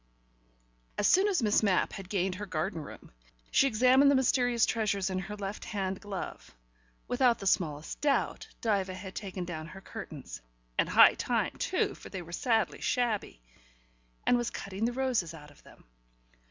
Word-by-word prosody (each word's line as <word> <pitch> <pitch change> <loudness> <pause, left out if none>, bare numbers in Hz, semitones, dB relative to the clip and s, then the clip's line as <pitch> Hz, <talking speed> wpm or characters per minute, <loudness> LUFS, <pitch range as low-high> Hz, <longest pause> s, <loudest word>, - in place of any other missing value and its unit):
As - - +1
soon 385 +3 +5
as 370 - +1
Miss 210 -1 +3
Mapp 200 -4 +2
had 190 -2 -8
gained 190 -2 0
her 205 +3 -6
garden 160 -1 -2
room, - - -11 0.4
she 275 - +5
examined 255 +4 +5
the 280 - +5
mysterious 245 -2 +3
treasures 200 -4 0
in 185 - -1
her 210 +2 -6
left 200 0 -5
hand 195 -2 -3
glove. 195 - -7 0.5
Without 245 -1 +3
the 195 - -8
smallest 155 -5 0
doubt 285 -2 0
Diva 195 -4 0
had 190 0 -8
taken 190 -3 -5
down 160 -2 -6
her 190 - -10
curtains 130 - -8 0.3
(and - - +1
high - - +8
time - - -1
too, - - 0
for - - -12
they 185 -2 -6
were 170 - -12
sadly 225 +5 0
shabby), 225 - -1 0.8
and 245 - +4
was 240 -1 -1
cutting 195 +2 -4
the 240 - +1
roses 240 -10 -1
out 150 -2 -13
of 145 - -20
them. - - -18
200 Hz, 170 wpm, -30 LUFS, 185-240 Hz, 0.8 s, high